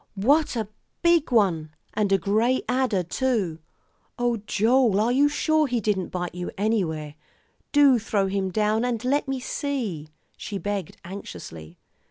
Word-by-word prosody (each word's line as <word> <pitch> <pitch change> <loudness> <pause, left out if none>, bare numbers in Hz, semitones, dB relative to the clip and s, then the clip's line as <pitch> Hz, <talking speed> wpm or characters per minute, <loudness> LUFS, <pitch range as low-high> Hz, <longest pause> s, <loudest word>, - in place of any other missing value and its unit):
What 280 +9 +2
a 220 -3 -2 0.4
big 340 -5 +3
one, 180 -9 +2 0.2
and 205 -2 0
a 195 - +5
gray 220 +7 +1
adder, 250 -7 +1
too. 195 -4 -1 0.6
Oh, 240 -1 +1
Joel, 225 -1 +3
are 225 +3 +2
you 280 +3 +4
sure 310 +1 +2
he 245 -2 0
didn't 205 -4 -1
bite 180 -1 -4
you 180 0 -5
anywhere? 175 -8 -1 0.6
Do 280 -4 +5
throw 205 -2 0
him 190 0 -1
down 215 +4 +1
and 245 -1 -2
let 280 +3 +1
me 270 -1 -2
see," 235 - -3 0.3
she 205 - -5
begged 200 -3 -4
anxiously. 85 - -9
215 Hz, 150 wpm, -25 LUFS, 190-255 Hz, 0.6 s, a